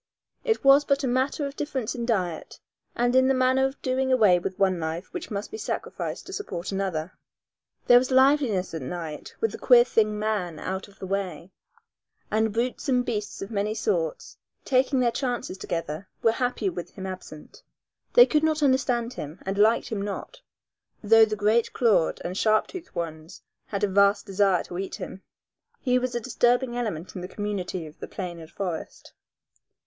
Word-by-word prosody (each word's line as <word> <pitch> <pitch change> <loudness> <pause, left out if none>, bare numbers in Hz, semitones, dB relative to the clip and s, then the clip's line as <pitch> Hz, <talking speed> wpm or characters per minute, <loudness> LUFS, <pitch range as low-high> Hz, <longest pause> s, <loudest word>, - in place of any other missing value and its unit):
It 450 -3 0
was 275 +1 +7
but 280 0 +1
a - - +1
matter 260 +4 0
of 280 0 -6
difference 265 -6 -3
in 235 -2 -4
diet 180 -8 -2 0.4
and 245 +1 +1
in 260 0 +5
the 270 - +3
manner 255 +1 +3
of 270 - -9
doing 260 0 0
away 210 -8 +5
with 185 +1 -5
one 190 -3 +2
life 160 +3 -4
which 360 - -5
must 205 -2 -4
be 435 - -6
sacrificed - - -4
to 380 - -9
support 195 - -5
another. 185 -4 -2 0.7
There 245 0 +8
was 255 - -2
liveliness 260 - +3
at 160 - -4
night 155 +2 -6
with 225 - +1
the - - -8
queer 245 -1 +7
thing, 215 -3 +1
man, 210 -6 -2
out 190 +1 -4
of 200 - -20
the - - -7
way, 185 -3 -3 0.8
and 220 0 +2
brutes 240 +5 -2
and 250 -1 +2
beasts 210 -5 -3
of 195 - -8
many 210 0 -1
sorts, - - -2 0.3
taking 265 0 +2
their 240 -1 +3
chances 245 -6 -3
together, 170 -1 -4 0.2
were 225 - +5
happier 240 -5 -1
with 175 0 -6
him 190 - -6
absent. 185 -5 -9 0.5
They 485 - +9
could 305 -8 +2
not 315 -1 +1
understand 255 -3 +1
him, 150 -3 -7
and 195 +1 -2
liked 215 +3 +3
him 215 -3 -3
not, 205 - -6 0.6
though 225 +1 +7
the 215 -1 -3
great 215 +3 +2
clawed 215 -9 +2
and 180 - -3
sharp 215 +2 +3
toothed 365 -3 -10
ones 160 0 -6 0.2
had 200 -1 -3
a - - +4
vast 200 +1 +3
desire 195 -3 +2
to 175 - -7
eat 195 - -4
him. 190 - -8 0.6
He 250 -1 +2
was 250 -1 -3
a - - +1
disturbing 245 +1 +1
element 205 -9 -4
in 180 - -5
the 180 - -5
community 190 -4 -4
of 155 0 -13
the - - -6
plain 175 -3 -6
and 160 -1 -11
forest. 180 -4 -6
215 Hz, 185 wpm, -26 LUFS, 185-255 Hz, 0.8 s, They